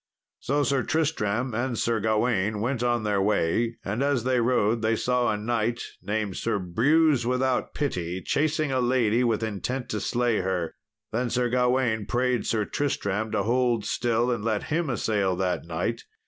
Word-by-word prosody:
So 145 +2 0
Sir 140 -2 +1
Tristram 130 -7 0
and 120 +1 -1
Sir 115 0 +1
Gawain 110 -1 +1
went 120 +3 -1
on 120 -2 +1
their 105 -2 +1
way, 105 +3 +1
and 105 +6 -2
as 140 -4 +1
they 130 0 +2
rode 115 -2 +2
they 110 0 +2
saw 125 +2 +1
a 105 - -1
knight, 115 +2 -1 0.2
named 105 0 -2
Sir 115 -2 0
Brewse 130 - +3
without 125 +1 0
pity, 90 - -2
chasing 155 - 0
a 130 - +1
lady, 120 -2 +2
with 115 -2 +1
intent 115 +4 -3
to 105 - -2
slay 120 -1 0
her. 90 -3 -2 0.4
Then 120 +2 -1
Sir 125 0 0
Gawain 125 -3 +1
prayed 125 -1 0
Sir 110 -2 +1
Tristram 110 -7 -1
to 100 -2 +1
hold 120 -1 +1
still 120 +1 +1
and 115 -4 -2
let 110 -2 0
him 165 -2 0
assail 105 -6 0
that 90 -2 -1
knight. 90 +8 -3
115 Hz, 170 wpm, -26 LUFS, 105-125 Hz, 0.4 s, Brewse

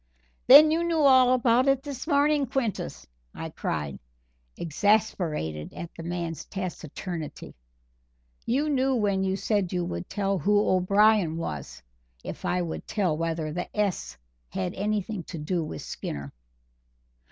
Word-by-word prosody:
"Then 300 +4 +10
you 330 +2 +1
knew 335 -2 +1
all 260 -3 +6
about 250 0 +3
it 270 -1 +3
this 285 -1 -6
morning, 290 -2 +3
Quintus," 230 - -3 0.3
I - - -6
cried, 75 -3 -3 0.6
exasperated 165 - 0
at 170 - -7
the - - -8
man's 170 -2 -4
taciturnity; 175 -3 -6 0.9
"you 275 +6 0
knew 270 -2 +2
when 200 -4 +1
you 190 0 0
said 200 -2 0
you 180 -1 -1
would 85 - -5
tell 195 -1 -1
who 205 +7 +3
O'Brien 195 -2 +3
was, 65 - -6 0.4
if - - -7
I 180 0 +1
would 165 - -6
tell 195 -7 0
whether 160 -1 -2
the 175 +2 -4
'S' 180 - -1 0.3
had 90 +7 -3
anything 210 0 -2
to 170 - -7
do 165 +3 -1
with 80 - -6
Skinner." 70 -1 -6
190 Hz, 140 wpm, -27 LUFS, 165-245 Hz, 0.9 s, Then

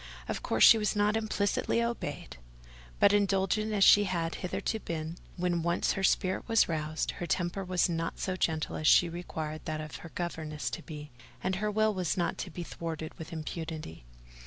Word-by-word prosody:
Of - - -3
course, - - +2
she 225 - +9
was 210 0 0
not 210 +1 +2
implicitly 215 0 0
obeyed; 235 - -3 0.6
but, 200 - +6
indulgent 205 +1 +2
as 205 -2 +3
she 205 +1 +7
had 170 -3 -1
hitherto 195 +4 -3
been, 165 -2 -5 0.2
when 175 -1 0
once 170 +1 +1
her 195 - -3
spirit 190 0 +1
was 225 -1 +4
roused, 155 -1 -2
her 175 - -2
temper 175 +3 -1
was 180 -1 +2
not 165 -1 -2
so 185 - -2
gentle 160 -4 -1
as 155 - 0
she 175 - +7
required 160 -2 -5
that 155 -1 -3
of 155 0 -6
her 170 - -10
governesses 160 -5 -3
to - - -5
be, 150 -2 -9 0.3
and 185 0 0
her 210 +2 -1
will 215 +1 +2
was 185 -3 -1
not 175 -2 -1
to - - -4
be 175 +1 -6
thwarted 160 -2 -5
with 160 - -8
impunity. 160 - -6
175 Hz, 185 wpm, -30 LUFS, 160-200 Hz, 0.6 s, she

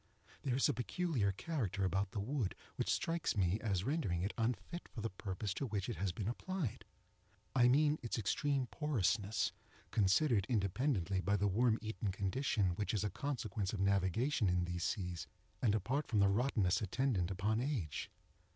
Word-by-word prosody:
There 130 -3 0
is 135 - +4
a 145 - +2
peculiar 125 - 0
character 105 - -2
about 95 +1 +1
the 100 - -4
wood 115 0 -1 0.2
which - - -1
strikes 165 -8 0
me 95 +2 +2
as 100 -5 0
rendering 110 - 0
it 100 - -1
unfit 115 - -2
for - - -9
the 115 +1 -2
purpose 95 +1 -3
to 135 - -3
which 100 -4 -2
it 120 - -3
has 100 -2 0
been 95 +3 -4
applied. 155 - -3 0.7
I 120 -2 +6
mean 150 +4 +4
its 115 - -2
extreme 135 +5 +1
porousness, 110 - +1 0.4
considered 105 +1 +3
independently 100 - +1
by 100 +2 +2
the 100 +1 +2
worm 110 +3 +3
eaten 110 -2 -2
condition 100 0 +1
which 105 +1 -1
is 100 - 0
a 105 - -1
consequence 110 -6 -2
of 105 - -3
navigation 100 - +2
in 90 -1 +2
these 90 -1 -3
seas, 90 -4 -2 0.3
and 110 -4 +3
apart 130 +8 -1
from 110 - 0
the 100 -1 +5
rottenness 105 -3 +2
attendant 105 -3 0
upon 105 +4 0
age. 120 - -2
105 Hz, 170 wpm, -36 LUFS, 95-130 Hz, 0.7 s, I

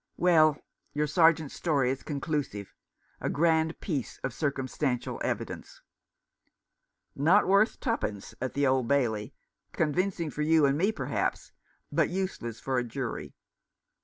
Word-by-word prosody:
Well, 155 -4 +5 0.4
your 150 +1 +1
Sergeant's 160 -1 +3
story 140 -7 +1
is 135 - -4
conclusive 145 - -3 0.2
— - - -38
a - - -1
grand 160 +1 +2
piece 145 - -3
of 130 - -2
circumstantial 135 -3 -2
evidence." - - -4 1.3
"Not 170 +9 +4
worth 200 +4 +3
twopence 105 - -2
at 130 - -3
the 140 0 +2
Old 130 -2 +2
Bailey. 120 -3 0 0.4
Con 155 -4 +1
vincing 180 -3 -1
for 150 - -4
you 155 0 +4
and 140 0 +3
me, 190 +8 +2
perhaps, - - -2 0.4
but - - +2
useless 180 - -3
for 130 -2 0
a - - -1
jury." 120 +1 -5
150 Hz, 135 wpm, -29 LUFS, 130-165 Hz, 1.3 s, Well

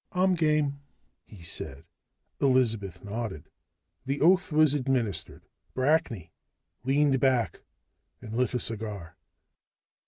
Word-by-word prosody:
"I'm 185 +1 +3
game," 150 -4 +1 0.5
he 95 -6 -13
said. 85 - -5 0.5
Elizabeth 115 -9 +1
nodded. 100 -6 -5 0.6
The 140 +1 -1
oath 180 +3 +4
was 155 -1 +4
administered. 130 -7 -2 0.3
Brackney 130 - +1 0.5
leaned 135 +1 +3
back 130 -4 +1 0.6
and 110 0 -8
lit 125 +1 +1
a - - +1
cigar. 105 -8 -3
130 Hz, 100 wpm, -28 LUFS, 110-145 Hz, 0.6 s, oath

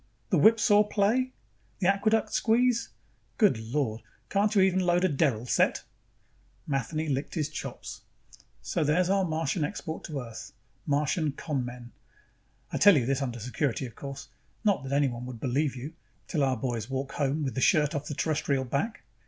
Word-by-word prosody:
The - - +4
whipsaw 215 -2 +6
play? 215 +5 +1 0.5
The 190 - -2
aqueduct 215 +3 +2
squeeze? 235 +1 +2 0.5
Good 205 - +4
Lord, 115 -1 -2 0.3
can't 205 +2 +2
you 195 - +6
even 190 -1 +3
load 180 0 +2
a - - +5
derrel 135 -7 +1
set?" - - +2 0.8
Matheny 155 +3 -2
licked 140 0 -2
his 155 -3 -1
chops. 155 - -7 0.6
"So - - -1
there's 175 +5 +2
our 195 -1 +3
Martian 160 -1 -1
export 160 0 -4
to 150 -4 -4
Earth. 115 -2 -9 0.3
Martian 150 +1 +1
con 145 -3 -3
men. 120 -1 -8 0.8
I - - -2
tell 205 -5 +7
you 125 - +1
this 135 +2 0
under 120 -3 -3
security, 125 +3 -2
of 120 - -9
course 140 +3 -8 0.3
not 205 -2 +2
that 135 - -6
anyone 130 -4 0
would 125 -3 -8
believe 135 +3 0
you, 135 +6 -7 0.3
till 150 -4 0
our 130 -2 +1
boys 115 -1 -3
walk 135 +1 -3
home 145 +2 -1
with 135 - -2
the 130 - -2
shirt 150 -1 +3
off 145 0 -3
the 145 - -4
Terrestrial 140 -4 0
back." 140 - -2
145 Hz, 170 wpm, -28 LUFS, 130-185 Hz, 0.8 s, tell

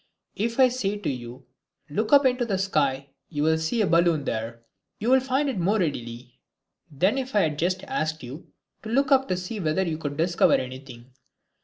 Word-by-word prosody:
If 230 +4 -2
I 260 - +8
say 215 -5 -2
to 205 - -3
you, 125 0 -8 0.4
"Look 215 +9 -2
up 285 -1 +6
into 250 -1 +2
the 205 -5 -1
sky, 140 -8 0 0.2
you 150 -3 -2
can 160 +1 +2
see 160 +9 0
a - - +3
balloon 170 -3 +3
there," 115 -1 -4 0.3
you 230 +4 -1
will 265 - +6
find 265 +2 0
it 255 -8 -2
more 195 +5 +2
readily 125 - -4 0.5
than 185 - +1
if 260 -3 -5
I 205 - +5
had 150 -3 -1
just 185 +2 0
asked 160 - -3
you 135 +7 -9 0.3
to 220 - -8
look 270 +4 +1
up 270 0 +4
to 185 - -1
see 185 +4 -5
whether 165 +1 0
you 160 -3 -3
could 145 -2 -5
discover 170 +2 +3
anything. 130 -1 -7
170 Hz, 200 wpm, -25 LUFS, 140-225 Hz, 0.5 s, I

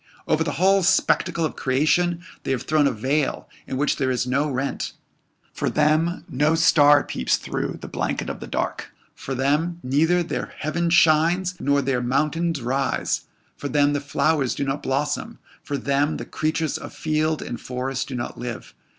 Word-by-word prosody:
Over - - +2
the - - -2
whole 190 +6 +4
spectacle 175 -2 +2
of 155 - -4
creation 165 +6 +1 0.2
they - - -6
have 130 -2 0
thrown 150 -2 +3
a - - +1
veil 135 +6 -1 0.2
in 130 - -3
which 145 +2 +1
there 130 -2 0
is 125 -1 0
no 140 +4 0
rent. 135 +1 -3 0.6
For - - -1
them 155 +3 +1
no 150 +5 +2
star 145 -3 +5
peeps 65 - 0
through - - -4
the - - -7
blanket - - -2
of - - -5
the - - -8
dark - - -3 0.2
for 135 - -5
them 150 +6 0
neither 160 +7 +2
their 170 - -5
heaven 170 +3 -1
shines 170 +2 +4
nor 140 0 +2
their 130 -2 0
mountains 150 +4 0
rise 135 +3 -1 0.3
for 145 - -5
them 145 0 +3
the 145 - -1
flowers 140 -1 +1
do - - -2
not 135 +1 -2
blossom 145 +11 -2 0.2
for 145 - -3
them 140 +2 0
the - - -6
creatures 155 -1 -1
of - - -9
field 155 0 0
and 120 - -6
forest 130 +1 -3
do 135 - -5
not 120 - -5
live. 120 -1 -6
145 Hz, 175 wpm, -23 LUFS, 135-160 Hz, 0.6 s, star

